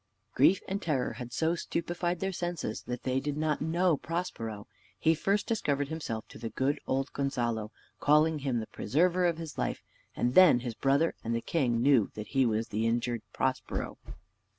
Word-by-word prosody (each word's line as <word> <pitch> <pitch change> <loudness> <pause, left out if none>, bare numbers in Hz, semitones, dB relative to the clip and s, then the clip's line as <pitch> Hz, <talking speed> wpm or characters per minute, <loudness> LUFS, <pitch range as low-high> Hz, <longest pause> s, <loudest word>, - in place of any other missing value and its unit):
Grief 160 +9 +4
and 195 +2 -2
terror 145 -8 0
had 120 -1 -7
so 160 +6 +1
stupefied 175 0 -2
their 195 0 0
senses, 175 - -3
that 125 0 -4
they 130 0 +1
did 145 +1 -3
not 155 -1 0
know 165 +1 +2
Prospero. 115 - -4 0.3
He 160 - +3
first 200 +6 0
discovered 145 -11 0
himself 130 -9 -4
to - - -11
the 115 0 -4
good 135 +5 0
old 135 +1 -1
Gonzalo, 120 -6 -1 0.3
calling 150 +1 +4
him 130 -4 -1
the 110 - -4
preserver 175 - +1
of 170 -2 0
his 165 -2 -7
life; - - -2 0.3
and 125 - 0
then 170 -9 +7
his 120 -2 -4
brother 140 +7 +2
and 115 0 -1
the - - +1
king 120 -7 0
knew 130 -7 +4
that 105 0 -6
he 135 -2 +3
was 110 0 -1
the 110 +2 0
injured 120 0 0
Prospero. - - -2
140 Hz, 180 wpm, -30 LUFS, 120-165 Hz, 0.3 s, then